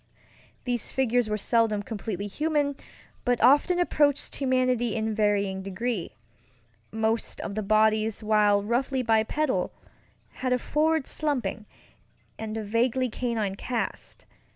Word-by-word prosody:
These 245 -3 -2
figures 245 -3 +1
were 210 - 0
seldom 215 -1 +1
completely 205 -2 -4
human, 290 +5 0 0.5
but 245 -1 +1
often 290 +9 +5
approached 295 -5 +1
humanity 255 -4 +1
in 220 0 -1
varying 200 -2 +1
degrees. 195 +1 -3 0.8
Most 220 +1 -1
of 200 - -5
the 215 - -2
bodies, 215 +1 +2
while 210 -1 +3
roughly 255 +4 0
bipedal, 230 +6 +1 0.6
had 255 -1 -2
a - - +3
forward 310 +3 +1
slumping, 265 -8 -2 0.7
and 220 0 -4
a 220 - -3
vaguely 240 +4 +1
canine 225 -4 -2
cast. 235 +4 -4
230 Hz, 120 wpm, -27 LUFS, 215-255 Hz, 0.8 s, often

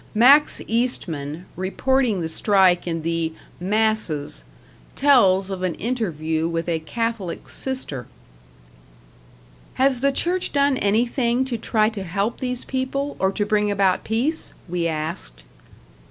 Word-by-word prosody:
Max 275 +7 +6
Eastman, 175 - -2
reporting 220 +3 0
the 165 - -2
strike 185 +1 +3
in 165 -2 -2
the 165 -1 -1 0.3
"Masses", 195 - 0 0.5
tells 200 -9 +4
of 190 -1 -4
an 185 -3 -1
interview 165 -9 -2
with 165 0 -2
a 165 -2 0
Catholic 225 +1 -3
sister. 205 - -4 1.7
"Has 265 -1 +2
the 275 +2 +2
Church 355 +6 0
done 280 -1 +3
anything 235 +4 +1
to 255 -2 -3
try 215 -1 +1
to 215 -3 -6
help 200 +5 -2
these 250 -2 -2
people, 270 +2 -2
or 190 0 +2
to 205 +1 -1
bring 210 0 +1
about 195 -2 +2
peace?" 255 +9 -1
we 175 -1 -1
asked. - - -5
205 Hz, 125 wpm, -22 LUFS, 170-250 Hz, 1.7 s, Max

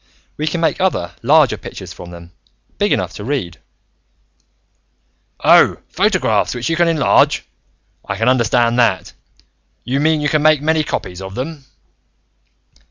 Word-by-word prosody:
We 155 - -3
can 165 +2 -2
make 165 +3 0
other, 170 - 0
larger 145 +1 +3
pictures - - -9
from 90 - -11
them, 85 0 -12 0.5
big - - +1
enough - - -1
to - - -8
be 115 - -7
read 90 - -3 0.8
" 65 -1 -34
"Oh, - - +5
photographs, - - 0
which 120 +5 -3
you - - +1
can 175 +1 +2
enlarge. 160 -3 +2 0.6
I 95 - -1
can 115 +2 -1
understand 120 -1 +2
that. 110 -6 +1 0.7
You 130 +3 -2
mean, 155 +1 +2
you 150 - -1
can 150 +1 +1
make 155 -1 +4
many 155 +1 +1
copies 90 -10 -5
of 95 +1 -8
them?" 140 +2 -6
130 Hz, 155 wpm, -17 LUFS, 100-155 Hz, 0.8 s, Oh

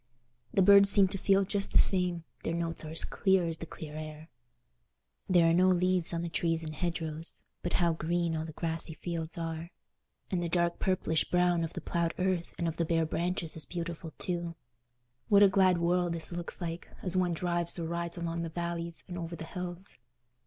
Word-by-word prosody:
The 195 - +3
birds 200 +1 +8
seem 200 -2 +6
to 195 - -2
feel 195 +1 +3
just 200 +1 -2
the - - +4
same: 180 -3 +5 0.2
their 165 - -2
notes 165 -1 -3
are 155 - -7
as 160 - +2
clear 190 -3 +2
as 165 -1 -2
the 165 - -7
clear 155 -1 -9
air. 155 +1 -8 1.0
There 175 -2 +5
are 165 - +4
no 180 +2 +4
leaves 180 -1 +2
on 170 0 -2
the - - -2
trees 165 0 -1
and 155 -1 -5
hedgerows, 165 -1 -4 0.2
but 175 - -3
how 170 -2 +2
green 170 +1 -1
all 155 - -2
the 160 - -7
grassy 160 0 -1
fields 165 -1 -5
are! 165 0 -4 0.6
And 180 -2 0
the 170 - -2
dark 170 0 +1
purplish 180 -4 +1
brown 180 -1 +2
of 165 - -4
the - - -5
ploughed 170 -1 -1
earth 185 -2 -1
and 170 - -1
of 165 0 -3
the 170 - +1
bare 165 0 +1
branches 170 0 -2
is 160 - -7
beautiful 170 -2 -5
too. 170 -2 -3 0.7
What 205 -1 +7
a - - +9
glad 190 -2 +4
world 175 0 +1
this 165 0 -3
looks 175 0 -3
like, 170 0 -5 0.2
as 185 -1 0
one 180 -2 +2
drives 175 0 -1
or 170 - -3
rides 170 +1 -3
along 170 0 -3
the 165 - -3
valleys 170 0 -4
and 175 -1 -6
over 170 0 -5
the 165 - -7
hills! 180 -1 -7
170 Hz, 205 wpm, -30 LUFS, 165-180 Hz, 1.0 s, a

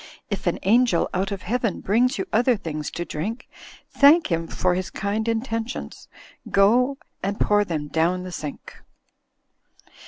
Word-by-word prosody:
If 195 -2 -3
an 175 - +1
angel 230 -2 +3
out 190 +2 -1
of 195 -2 -5
heaven 230 0 -1
Brings 245 +7 +2
you - - -2
other 240 +1 +3
things 155 -6 -5
to 175 - -5
drink, 205 +12 -5 0.4
Thank 290 - +5
him 165 0 0
for 180 +2 0
his 185 +1 -3
kind 210 +3 -2
intentions, 230 +1 -3 0.4
Go 245 +7 +3 0.3
snd, 200 +1 -2
pour 205 0 +3
them 155 -6 -3
down 170 +4 0
the 185 - -7
sink. 150 -4 -8
200 Hz, 150 wpm, -23 LUFS, 180-235 Hz, 0.4 s, Thank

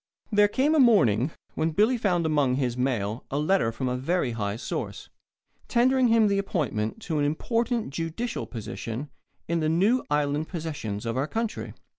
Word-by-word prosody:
There 205 -1 +5
came 270 +8 +1
a 315 - +4
morning 150 - +4 0.2
when 160 0 -1
Billy 215 +9 +3
found 180 -7 +1
among 145 -5 +2
his 125 -3 -1
mail 120 -4 -1
a 140 - -2
letter 150 -5 +2
from 120 +3 -3
a 125 - 0
very 135 +1 0
high 105 -3 -2
source, 115 - -5 0.6
tendering 255 +1 +3
him 225 -2 +4
the 200 -1 +2
appointment 145 - -2
to 160 -3 -1
an - - +2
important 230 - -1
judicial 165 - -3
position 115 +3 -6 0.4
in 170 0 0
the 155 -1 +1
new 200 +10 +3
island 145 +1 0
possessions 150 - -5
of 115 +1 -2
our 135 +3 0
country. 225 +4 -3
155 Hz, 170 wpm, -26 LUFS, 125-210 Hz, 0.6 s, There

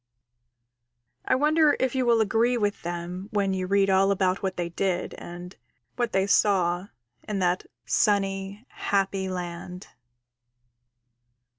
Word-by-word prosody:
I - - +3
wonder 300 +2 +3
if 260 -2 0
you 260 -2 0
will 230 -1 +4
agree 230 +4 +2
with 205 -2 -1
them 175 +2 -5
when 200 -2 0
you 185 -1 -2
read 195 0 +3
all 195 0 +4
about 190 -1 +1
what 190 -1 -3
they 175 -1 -2
did 180 +1 -2
and 175 +1 -9 0.4
what 240 -2 -1
they 190 0 +2
saw 185 -3 +2 0.4
in 210 - -2
that 180 -1 0 0.2
sunny, 195 +1 0
happy 195 -1 -1
land. 180 0 -6
195 Hz, 130 wpm, -26 LUFS, 180-210 Hz, 0.4 s, will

